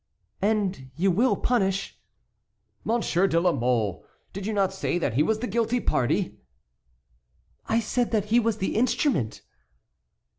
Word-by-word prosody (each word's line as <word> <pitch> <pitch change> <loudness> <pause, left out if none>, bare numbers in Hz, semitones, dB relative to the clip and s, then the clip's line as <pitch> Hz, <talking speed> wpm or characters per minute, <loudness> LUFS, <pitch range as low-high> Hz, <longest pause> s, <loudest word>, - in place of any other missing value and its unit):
"And 195 -9 0
you 190 +4 +2
will 235 +9 +3
punish"— 195 -5 -1 0.8
"Monsieur 205 -5 +1
de 165 -2 +2
la 175 +1 +3
Mole; 115 - 0 0.3
did 195 +1 -5
you - - -1
not 195 -2 +1
say 190 -2 -1
that 140 -9 -1
he 135 - +2
was 215 +8 +2
the 250 - -2
guilty 230 +3 0
party?" 125 - 0 1.3
"I 225 - +2
said 240 +2 0
that 215 -3 0
he 240 - +7
was 225 -2 0
the 190 - -2
instrument." 220 - 0
195 Hz, 145 wpm, -26 LUFS, 170-225 Hz, 1.3 s, he